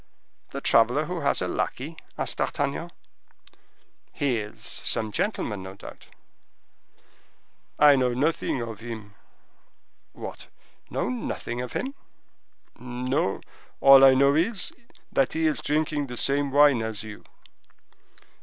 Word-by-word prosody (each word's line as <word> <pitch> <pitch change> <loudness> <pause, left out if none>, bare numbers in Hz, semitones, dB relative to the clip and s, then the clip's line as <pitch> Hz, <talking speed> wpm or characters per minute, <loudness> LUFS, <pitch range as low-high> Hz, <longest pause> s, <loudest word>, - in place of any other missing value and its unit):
"The - - -6
traveler - - +3
who - - -4
has - - +1
a - - -1
lackey?" 150 +6 -3 0.2
asked - - -2
D'Artagnan. - - -2 1.2
"He 130 -5 0
is 105 0 -9
some 110 -1 +2
gentleman, 105 - -2
no 95 +1 -9
doubt?" - - -12 1.7
"I 145 -1 +7
know 125 -2 +1
nothing 140 -2 0
of 115 -3 -7
him." 110 -3 -8 1.0
"What!—know - - -7
nothing 125 -1 -4
of 125 - -6
him?" 270 +2 -3 0.9
"No, 125 -3 -2 0.4
all 135 0 +8
I 135 -1 +8
know 140 +1 +4
is, 180 +6 +1 0.4
that 135 -2 +1
he 160 0 0
is 155 - 0
drinking 150 -1 -1
the 125 -1 -8
same 140 +2 +2
wine 145 -3 +5
as 110 -1 -4
you." 110 -1 -10
130 Hz, 120 wpm, -25 LUFS, 115-145 Hz, 1.7 s, all